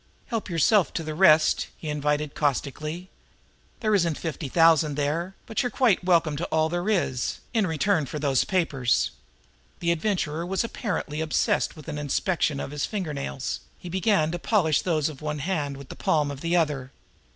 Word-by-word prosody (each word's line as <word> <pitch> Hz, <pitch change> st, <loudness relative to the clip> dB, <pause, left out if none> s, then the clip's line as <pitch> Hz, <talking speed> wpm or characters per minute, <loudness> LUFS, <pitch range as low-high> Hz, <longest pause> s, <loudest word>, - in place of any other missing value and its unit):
"Help 225 Hz, -4 st, -3 dB
yourself 180 Hz, +3 st, +3 dB
to 165 Hz, -, -3 dB
the 155 Hz, 0 st, -4 dB
rest!" 155 Hz, -2 st, +5 dB
he 160 Hz, -, -8 dB
invited 150 Hz, 0 st, -1 dB
caustically. 150 Hz, +5 st, -2 dB, 0.7 s
"There 215 Hz, -2 st, +1 dB
isn't 170 Hz, -6 st, +2 dB
fifty 160 Hz, -3 st, -4 dB
thousand 160 Hz, -2 st, +4 dB
there, 160 Hz, +6 st, -1 dB
but 225 Hz, -, -1 dB
you 250 Hz, -, 0 dB
are -, -, -4 dB
quite 230 Hz, -5 st, +2 dB
welcome 170 Hz, -4 st, +3 dB
to 170 Hz, -, -2 dB
all 160 Hz, 0 st, +1 dB
there 175 Hz, +4 st, -2 dB
is 150 Hz, -, 0 dB, 0.2 s
in 220 Hz, -5 st, +2 dB
return 160 Hz, -1 st, +1 dB
for 150 Hz, -, -5 dB
those 140 Hz, -3 st, +2 dB
papers." 140 Hz, -10 st, +1 dB, 0.7 s
The 170 Hz, -1 st, +1 dB
Adventurer 170 Hz, -3 st, -1 dB
was 190 Hz, +4 st, -1 dB
apparently 175 Hz, -, -3 dB
obsessed 160 Hz, -1 st, +1 dB
with 155 Hz, -3 st, -12 dB
an 150 Hz, -, -4 dB
inspection 150 Hz, 0 st, 0 dB
of -, -, -5 dB
his 145 Hz, -1 st, -2 dB
finger 185 Hz, -8 st, -3 dB
nails; 140 Hz, -2 st, -4 dB, 0.2 s
he 180 Hz, -, -9 dB
began 190 Hz, -3 st, +2 dB
to 175 Hz, -, -3 dB
polish 165 Hz, -8 st, +2 dB
those 155 Hz, -5 st, +1 dB
of 155 Hz, -3 st, -8 dB
one 150 Hz, 0 st, -3 dB
hand 145 Hz, -3 st, -2 dB
with 140 Hz, -1 st, -11 dB
the -, -, -8 dB
palm 150 Hz, -2 st, +1 dB
of 140 Hz, -1 st, -8 dB
the 170 Hz, +1 st, 0 dB
other. 145 Hz, -6 st, 0 dB
160 Hz, 185 wpm, -26 LUFS, 150-180 Hz, 0.7 s, rest